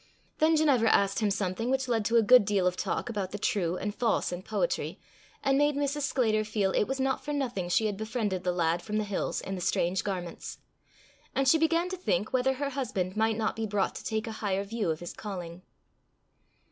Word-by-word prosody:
Then 320 +1 +4
Ginevra 275 -8 +4
asked 200 -1 +3
him 215 -2 +1
something 200 +3 -1
which 265 0 0
led 225 -3 0
to 230 - +1
a 230 - +5
good 250 +2 +7
deal 200 -2 +1
of 180 0 +2
talk - - -2
about 205 -5 -3
the 205 - -5
true 190 -6 0
and 205 +1 -3
false 230 -4 0
in 175 0 -4
poetry, - - -2 0.4
and 275 0 +3
made 290 0 +3
Mrs. 285 +1 -1
Sclater 220 -4 +2
feel 210 -2 0
it - - +2
was 270 0 -3
not 265 0 0
for 295 - -4
nothing 245 -11 -2
she 220 +5 +2
had 205 -2 -1
befriended 215 -4 -2
the 180 - +1
lad 170 -1 +1
from 210 +2 -3
the 215 - +1
hills 200 -2 -2
in 195 - -5
the 185 - -4
strange 180 +2 0
garments. 180 -4 -5 0.8
And 270 0 +2
she 320 +4 +5
began 330 +2 +2
to 375 - -4
think 210 - -1
whether 260 +1 +2
her 280 +1 -3
husband 215 -9 -2
might 220 0 +1
not 220 -1 -1
be 225 0 -2
brought 200 -1 0
to - - -8
take 220 -1 -2
a 225 - -5
higher 195 -2 0
view 210 -2 -2
of 160 0 -2
his 175 - -6
calling. 180 -4 -7
215 Hz, 225 wpm, -29 LUFS, 190-260 Hz, 0.8 s, good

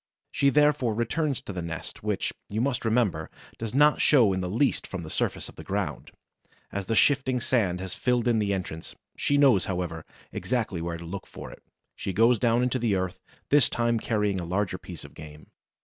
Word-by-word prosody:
She 140 - +3
therefore 145 -5 +3
returns 135 +5 -1
to 100 - -7
the 90 - -4
nest, 85 -1 -6
which, - - -1 0.2
you 105 - -2
must 125 -1 0
remember, 110 -9 +1 0.3
does 115 +1 -4
not 150 +1 +5
show 120 -10 +5
in 95 - -1
the 90 - -3
least 120 +8 +1
from 95 -3 -5
the 80 - -8
surface - - -1
of - - -14
the - - -8
ground, - - -3 0.6
as 100 -1 -4
the 115 - 0
shifting 130 +1 +3
sand 105 -8 +1
has 95 0 -5
filled 125 -1 0
in 115 -2 +3
the 105 -1 0
entrance; 90 -4 -4 0.2
she 145 - +1
knows, 130 -10 +5
however, 90 -4 -3 0.3
exactly 110 -8 -2
where 85 0 -3
to 85 - -9
look 95 +3 -6
for - - -9
it; - - -13 0.3
she 95 - -4
goes 115 +4 +4
down 120 +1 +3
into 125 +1 0
the 115 -4 +1
earth, 95 -1 -2 0.3
this 145 -3 +5
time 120 -1 +1
carrying 105 -4 0
a - - -4
larger 95 +3 -1
piece - - -9
of - - -13
game. 75 0 -12
110 Hz, 205 wpm, -27 LUFS, 90-125 Hz, 0.6 s, not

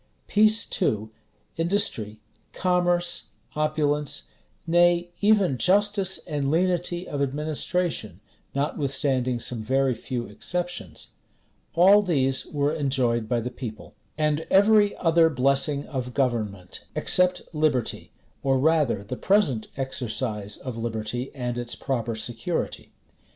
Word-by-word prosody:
Peace 215 +2 +3
too, 110 - -1 0.5
industry, 165 - +1 0.3
commerce, 175 -1 +1 0.3
opulence; 150 - 0 0.4
nay, 175 +1 +3
even 200 - +3
justice 200 0 +2
and 145 -4 -2
lenity 175 +2 0
of 145 -1 -3
administration, 150 - -2 0.4
notwithstanding 135 -3 0
some 120 -1 -3
very 130 +3 +1
few 120 +1 -4
exceptions; 170 - -5 0.7
all 195 +5 +7
these 135 -8 0
were 145 0 0
enjoyed 130 -7 0
by 120 - +1
the 120 +2 -4
people; 115 -4 -8 0.2
and 150 0 0
every 205 +1 +5
other 165 -1 +4
blessing 140 +1 +1
of 125 -3 -5
government, 105 -8 -2
except 180 0 +2
liberty, 150 -6 0 0.3
or 135 -1 +2
rather 145 -7 +2
the 115 +5 -5
present 155 - +2
exercise 115 -5 -3
of 130 -4 -6
liberty 115 +2 -3
and 120 -2 -3
its 120 0 -3
proper 120 -3 -2
security. 120 +9 -3
140 Hz, 110 wpm, -25 LUFS, 120-175 Hz, 0.7 s, all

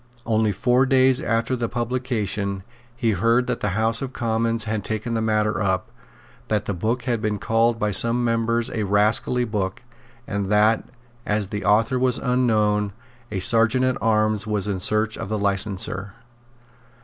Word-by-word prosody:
Only 110 -1 +1
four 125 +6 +2
days 130 0 +4
after 115 +1 0
the 120 -2 -2
publication 110 -5 -2 0.3
he 120 -2 0
heard 115 +5 +2
that - - -2
the 105 -1 -2
House 115 +1 +1
of 135 -1 -5
Commons 115 -1 -1
had 110 -1 -3
taken 110 +2 -3
the 115 - 0
matter 105 -2 0
up, 95 -2 -1 0.6
that 105 -1 -1
the 100 - -2
book 115 +7 -2
had 120 -3 -1
been 105 -1 -1
called 115 +3 +1
by 105 -2 -1
some 115 +4 +2
members 115 0 0
a 110 - -2
rascally 105 +4 +2
book, 105 -1 -3 0.4
and 100 -3 -3
that, 105 +2 +3 0.3
as 105 -3 -1
the 105 -1 -4
author 115 +5 +2
was 125 -1 +2
unknown, 110 -5 +1 0.4
the 100 - -3
Serjeant 115 +5 +3
at 130 -1 0
Arms 110 -2 +1
was 105 -2 -1
in 100 -2 -2
search 110 +3 0
of - - -5
the 110 - -1
licenser. 100 -1 -2
110 Hz, 165 wpm, -23 LUFS, 105-120 Hz, 0.6 s, days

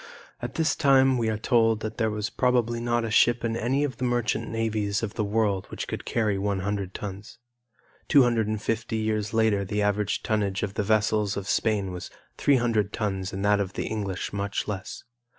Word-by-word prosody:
At 120 0 -5
this 160 -1 +1
time 135 -3 +4
we 115 -1 +1
are 110 - -1
told 115 -1 +2
that 110 0 -5
there 110 - +1
was 105 0 -3
probably 120 -2 +1
not 120 0 0
a 110 - -4
ship 120 +2 +4
in 115 -1 -1
any 125 +5 0
of 130 -5 -3
the - - -4
merchant 120 -2 0
navies 110 -2 -1
of 105 -2 -3
the 110 - -1
world 100 -2 0
which - - -5
could - - -5
carry 105 -4 0
one 100 -1 -1
hundred 100 -1 -3
tons. 100 +2 -7 0.7
250 115 -3 +2
years 110 -1 -1
later 110 -3 +2
the 105 +2 -1
average 105 0 0
tonnage 100 -3 0
of 100 -1 -2
the 105 - -1
vessels 105 -1 +1
of 100 -1 -5
Spain 105 -3 +1
was 90 -1 -7 0.3
300 115 -7 +2
tons 95 -3 -2
and 100 +1 -3
that 105 0 +4
of 95 -1 -2
the - - -3
English 100 -4 -3
much 100 0 -2
less. 95 -3 -5
110 Hz, 190 wpm, -26 LUFS, 100-115 Hz, 0.7 s, time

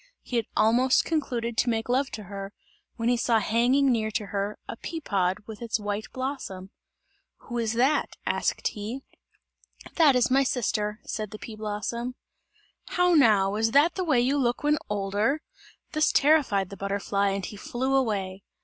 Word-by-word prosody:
He 245 - -2
had 230 - -1
almost 245 +4 +4
concluded 240 -7 -2
to 245 - +2
make 225 -1 -1
love 260 +2 +1
to 215 - -5
her, 195 +1 -7 0.4
when 230 - -2
he 245 - +4
saw 230 -1 +2
hanging 245 +6 +3
near 220 -2 0
to 210 0 -2
her, 200 +1 -2
a - - -5
pea 325 +7 -6
pod 190 - 0
with 220 0 -9
its 230 -1 -1
white 205 +1 -3
blossom. 255 -8 -5 0.7
"Who 240 -1 -5
is 225 -1 0
that?" 260 +6 +1
asked - - 0
he. 220 +6 -6 0.9
"That 305 -6 +6
is 250 0 +2
my 270 +1 +5
sister," 215 -4 -1
said 215 -2 -4
the 215 - -8
pea 220 0 -9
blossom. 220 +4 -4 0.7
"How 360 0 +2
now, 210 -10 +5
is 225 +1 +1
that 300 +4 +5
the 375 - -2
way 300 -8 +3
you 265 +4 +2
look 245 0 0
when 300 0 +2
older?" 210 +9 0 0.5
This 310 0 +2
terrified 275 - +3
the 200 - -8
butterfly 200 0 0
and 195 -1 -2
he 210 - -7
flew 255 +6 -2
away. 200 -7 -1
230 Hz, 175 wpm, -26 LUFS, 205-265 Hz, 0.9 s, That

